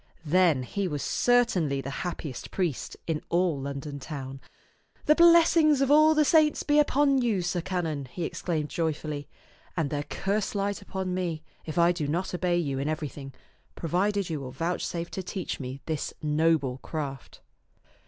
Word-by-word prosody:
Then 160 -4 +3
he 195 +9 -2
was 145 -4 -3
certainly 195 - +2
the 135 0 -5
happiest 160 -7 -5
priest 175 -8 -2
in 160 -2 -2
all 170 -4 +1
London 140 +1 -5
town. 135 -2 -7 0.6
"The 300 - +6
blessings 330 -3 +6
of 275 0 +2
all 310 +1 +6
the 305 0 +4
saints 310 0 +4
be 295 0 +3
upon 280 -2 +3
you, 215 -7 +1
sir 175 0 -1
canon," 165 -6 -2
he 170 +7 -6
exclaimed 160 -2 -2
joyfully, 155 -3 -3 0.5
"and 155 -4 0
their 145 -1 -1
curse 200 +8 -2
light 200 0 -1
upon 190 -2 -4
me 170 -4 -2 0.2
if 155 - -5
I 170 0 +5
do 165 -5 -2
not 175 +6 -2
obey 175 0 +1
you 140 -6 -1
in 140 +2 -1
everything, 150 -3 -5 0.4
provided 195 +4 0
you 160 -3 -3
will 135 -2 -6
vouchsafe 170 +3 -3
to 190 - -4
teach 185 0 -4
me 130 +1 -6
this 155 -3 -3
noble 150 -4 +1
craft." 140 -5 -6
170 Hz, 165 wpm, -27 LUFS, 145-195 Hz, 0.6 s, The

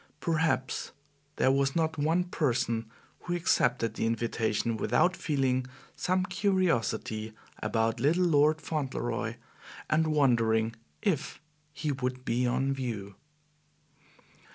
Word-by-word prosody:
Perhaps 160 -5 0 0.4
there 130 - +3
was 135 0 +1
not 160 -1 +1
one 165 +5 +2
person 125 -9 -1 0.3
who 175 - -3
accepted 120 -9 +2
the 115 - -1
invitation 115 0 0
without 125 - +2
feeling 130 -6 0 0.3
some 185 +1 +1
curiosity 180 - 0 0.3
about 115 0 0
little 165 +8 +3
Lord 155 -1 +4
Fauntleroy, 145 -5 -2 0.6
and 160 +1 +3
wondering 115 -6 +2 0.3
if 155 - -1 0.3
he 150 0 -2
would 130 -1 -3
be 125 +1 +1
on 130 +3 +1
view. 115 -7 -4
135 Hz, 105 wpm, -29 LUFS, 115-160 Hz, 0.6 s, Lord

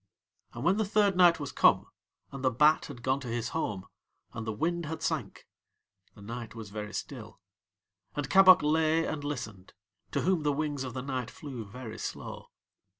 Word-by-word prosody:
And 120 - -6
when 185 +5 +3
the 220 - +2
third 205 -1 +2
night 175 -2 +6
was 145 -2 -5
come, - - +4 0.5
and 135 -1 -7
the 130 - +4
bat 150 +6 +4
had 120 - -10
gone 130 +1 +1
to 135 - -8
his 115 -1 -2
home, 95 -3 -3 0.5
and 110 0 -6
the - - 0
wind 165 +9 -1
had 160 +1 -5
sank, - - -3 0.7
the 100 - -13
night 115 +2 -7
was 110 -3 -8
very 105 0 -5
still. - - -7 0.8
And 145 -2 -2
Kabok 185 +1 +7
lay 160 +1 +2
and 145 -2 -4
listened, 110 -10 -6 0.3
to - - -1
whom 185 -2 +2
the 145 -1 +1
wings 145 -2 -2
of 130 -1 -6
the 125 - -4
night 130 -3 -3
flew 130 -6 -7
very 110 +1 -8
slow. - - -6
140 Hz, 185 wpm, -30 LUFS, 115-160 Hz, 0.8 s, Kabok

